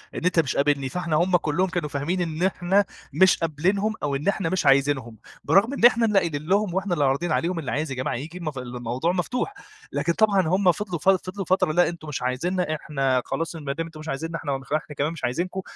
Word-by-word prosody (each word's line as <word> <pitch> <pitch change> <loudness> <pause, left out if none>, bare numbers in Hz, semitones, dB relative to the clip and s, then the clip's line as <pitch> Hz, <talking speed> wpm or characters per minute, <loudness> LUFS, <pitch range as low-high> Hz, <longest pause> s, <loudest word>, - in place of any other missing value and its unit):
إن - - -4
أنتَ 180 -2 +3
مش 140 -6 +1
قابِلني. 140 -2 +1
فإحنا 170 -1 -2
هُم 175 +3 +3
كلهم 175 +4 0
كانوا 165 -4 -2
فاهمين 160 +7 -2
إن 165 0 -2
إحنا 190 +1 +2 0.3
مش 190 0 +5
قابلينهم 185 +7 0
أو 140 -1 0
إن 145 +7 -4
إحنا 195 -4 +1
مش 185 -4 -1
عايزينهم، 135 -4 +2 0.3
برغم 220 +7 +3
إن 240 - +3
إحنا 235 -1 +6
اللي 210 -3 +4
قايلين 155 -4 -3
لهُم 200 0 +2
وإحنا 190 0 -1
اللي 150 -4 +2
عارضين 140 +5 0
عليهم، 170 +1 0
اللي 140 - -4
عايز 150 -1 -2
يا - - -3
جماعة 130 - -2
ييجي 155 +8 -6
المف 155 -6 -5
الموضوع 125 +4 -2
مفتوح. 245 - -2 0.4
لكن 170 - 0
طبعًا 205 -2 +3
هُم 185 +2 +4
فضلوا 180 -3 -4
ف 190 - +2
فضلوا 190 0 0
فترة: 185 -3 +2
"لأ 175 +2 +3
أنتُم 165 -2 -9
مش 150 - -4
عايزينَّا، 155 +7 -1
إحنا 135 -4 0
خلاص 165 +1 -3
ما 145 -4 -4
دام 165 +3 -3
أنتُم 160 -2 -11
مش 155 - -9
عايزينَّا، 165 +4 -3
إحنا 140 -4 -2
نخ 135 +1 -8
إحنا 155 -1 -2
كمان 145 +3 0
مش 165 - -10
عايزينكُم." 175 +10 -2
165 Hz, 230 wpm, -24 LUFS, 145-185 Hz, 0.4 s, إحنا